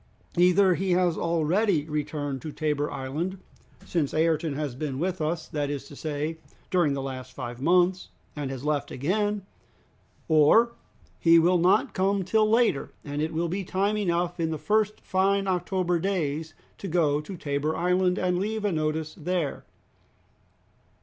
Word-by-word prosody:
Either 180 Hz, +1 st, +5 dB
he 185 Hz, +1 st, 0 dB
has 175 Hz, -2 st, +2 dB
already 170 Hz, +1 st, +1 dB
returned 145 Hz, -3 st, -3 dB
to 155 Hz, -, -6 dB
Tabor 150 Hz, -1 st, -1 dB
Island, 145 Hz, +8 st, -3 dB, 0.5 s
since 155 Hz, -5 st, -1 dB
Ayrton 160 Hz, -1 st, +1 dB
has 145 Hz, -3 st, -3 dB
been 135 Hz, 0 st, -4 dB
with 180 Hz, +3 st, -2 dB
us, 160 Hz, +2 st, -2 dB
that 145 Hz, -2 st, -2 dB
is 145 Hz, -2 st, -4 dB
to 145 Hz, -, -11 dB
say, 155 Hz, +2 st, -3 dB, 0.3 s
during 175 Hz, -6 st, +3 dB
the 135 Hz, -, -3 dB
last 130 Hz, -1 st, -6 dB
five 120 Hz, -1 st, -6 dB
months 180 Hz, +4 st, +2 dB, 0.3 s
and 145 Hz, -3 st, -3 dB
has 135 Hz, -1 st, -6 dB
left 150 Hz, -1 st, 0 dB
again; 205 Hz, +7 st, -1 dB, 0.8 s
or 160 Hz, +10 st, +5 dB, 0.5 s
he 165 Hz, 0 st, +6 dB
will 175 Hz, +2 st, +4 dB
not 180 Hz, +3 st, +3 dB
come 195 Hz, +1 st, +1 dB
till 215 Hz, +4 st, +2 dB
later, 225 Hz, -, +2 dB, 0.2 s
and 145 Hz, 0 st, -3 dB
it 155 Hz, -, -1 dB
will 165 Hz, +2 st, -1 dB
be 190 Hz, +4 st, -2 dB
time 195 Hz, +3 st, 0 dB
enough 175 Hz, -3 st, -1 dB
in 165 Hz, -1 st, 0 dB
the 160 Hz, -, -2 dB
first 215 Hz, +5 st, 0 dB
fine 195 Hz, +1 st, +1 dB
October 180 Hz, -1 st, 0 dB
days 160 Hz, -4 st, -2 dB, 0.2 s
to 195 Hz, -, -5 dB
go 155 Hz, -4 st, +2 dB
to 180 Hz, +5 st, -8 dB
Tabor 145 Hz, +1 st, -1 dB
Island, 180 Hz, +1 st, +2 dB
and 180 Hz, -1 st, +1 dB
leave 215 Hz, +2 st, -2 dB
a 205 Hz, -, +2 dB
notice 155 Hz, -1 st, -1 dB
there." 170 Hz, -2 st, -3 dB
165 Hz, 160 wpm, -26 LUFS, 150-185 Hz, 0.8 s, he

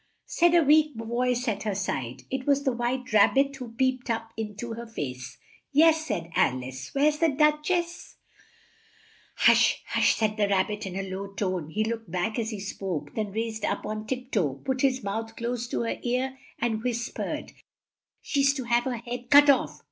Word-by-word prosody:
said 345 Hz, 0 st, +3 dB
a 340 Hz, -, +6 dB
weak 300 Hz, 0 st, +4 dB
voice 245 Hz, +2 st, -1 dB
at 210 Hz, -3 st, -1 dB
her 210 Hz, -3 st, -2 dB
side. 130 Hz, -11 st, -3 dB
It 265 Hz, 0 st, -3 dB
was 280 Hz, 0 st, +3 dB
the 270 Hz, -, +2 dB
White 245 Hz, 0 st, -2 dB
Rab 210 Hz, +3 st, +5 dB
bit 275 Hz, 0 st, +2 dB
who 245 Hz, -3 st, -8 dB
peeped 260 Hz, 0 st, 0 dB
up 225 Hz, 0 st, -2 dB
in 215 Hz, -2 st, -5 dB
to 230 Hz, +2 st, -5 dB
her 235 Hz, +1 st, -7 dB
face. 130 Hz, -, -6 dB, 0.3 s
"Yes," 315 Hz, +2 st, +4 dB
said 170 Hz, -, -3 dB
Al 130 Hz, -1 st, +2 dB
ice: 130 Hz, +1 st, -7 dB
"where's 295 Hz, +2 st, +3 dB
the 330 Hz, -, +4 dB
Duch 300 Hz, +2 st, +2 dB
ess?" 345 Hz, -1 st, -2 dB, 1.2 s
"Hush! -, -, +4 dB
Hush!" -, -, +3 dB
said 215 Hz, -1 st, 0 dB
the 205 Hz, -1 st, +2 dB
Rab 195 Hz, -1 st, +2 dB
bit, 210 Hz, -1 st, -4 dB
in 185 Hz, -, -6 dB
a 195 Hz, 0 st, -3 dB
low 190 Hz, +1 st, -5 dB
tone. 185 Hz, -6 st, -2 dB
He 215 Hz, +6 st, 0 dB
looked 225 Hz, -3 st, -4 dB
back 185 Hz, +7 st, -1 dB
as 220 Hz, -1 st, -1 dB
he 215 Hz, -3 st, -5 dB
spoke, 185 Hz, -7 st, -4 dB
then 215 Hz, -2 st, -3 dB
raised 220 Hz, 0 st, -3 dB
up -, -, -1 dB
on 215 Hz, 0 st, -4 dB
tip 255 Hz, +1 st, -4 dB
toe, 155 Hz, -, +1 dB
put 260 Hz, 0 st, -1 dB
his 260 Hz, -3 st, +1 dB
mouth 225 Hz, +3 st, -4 dB
close 235 Hz, 0 st, -3 dB
to -, -, -2 dB
her 230 Hz, -, -2 dB
ear 255 Hz, +2 st, -1 dB, 0.2 s
and 225 Hz, -2 st, -1 dB
whis 235 Hz, -1 st, -1 dB
pered, -, -, -4 dB, 0.7 s
"She's 280 Hz, -1 st, +2 dB
to 265 Hz, -, -3 dB
have 240 Hz, 0 st, +1 dB
her 255 Hz, -2 st, -2 dB
head 240 Hz, +1 st, -7 dB
cut 290 Hz, 0 st, +8 dB
off." 270 Hz, -, -1 dB
235 Hz, 200 wpm, -27 LUFS, 205-265 Hz, 1.2 s, cut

